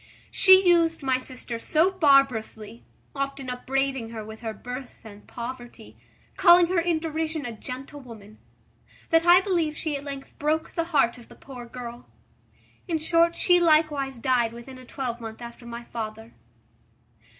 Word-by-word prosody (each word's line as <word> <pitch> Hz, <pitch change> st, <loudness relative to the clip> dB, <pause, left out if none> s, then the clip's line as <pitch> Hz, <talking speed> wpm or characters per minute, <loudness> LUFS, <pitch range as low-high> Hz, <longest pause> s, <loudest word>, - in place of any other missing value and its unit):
She 380 Hz, -1 st, +6 dB
used 330 Hz, -3 st, +3 dB
my 260 Hz, -1 st, +1 dB
sister 250 Hz, -2 st, -7 dB
so 320 Hz, +9 st, +2 dB
barbarously, 255 Hz, -, +1 dB, 0.3 s
often 275 Hz, -2 st, -4 dB
upbraiding 265 Hz, -1 st, -2 dB
her 220 Hz, -2 st, -7 dB
with 220 Hz, 0 st, -10 dB
her 225 Hz, -2 st, -5 dB
birth 250 Hz, +4 st, -9 dB
and 210 Hz, -2 st, -13 dB
poverty, 240 Hz, 0 st, -9 dB, 0.4 s
calling 350 Hz, -1 st, +7 dB
her 365 Hz, -1 st, +2 dB
in 335 Hz, -1 st, +1 dB
derision 315 Hz, -1 st, -3 dB
a 240 Hz, -, -4 dB
gentlewoman, 240 Hz, -3 st, -10 dB, 0.7 s
that 330 Hz, +1 st, +3 dB
I 355 Hz, +1 st, +8 dB
believe 340 Hz, -6 st, -1 dB
she 310 Hz, -2 st, -3 dB
at 280 Hz, -, -6 dB
length 275 Hz, -1 st, -8 dB
broke 310 Hz, +2 st, -1 dB
the 335 Hz, -, -1 dB
heart 270 Hz, -7 st, +1 dB
of 235 Hz, -, -16 dB
the -, -, -14 dB
poor 250 Hz, -3 st, -11 dB
girl. 240 Hz, 0 st, -9 dB, 0.8 s
In 335 Hz, -3 st, 0 dB
short, 335 Hz, +2 st, +2 dB
she 355 Hz, -1 st, +4 dB
likewise 305 Hz, -5 st, +2 dB
died 240 Hz, -1 st, +1 dB
within 255 Hz, +2 st, -11 dB
a 255 Hz, -, -13 dB
twelvemonth 235 Hz, -4 st, -6 dB
after 235 Hz, 0 st, -10 dB
my 235 Hz, 0 st, -7 dB
father. 225 Hz, -1 st, -7 dB
270 Hz, 150 wpm, -25 LUFS, 235-320 Hz, 0.8 s, I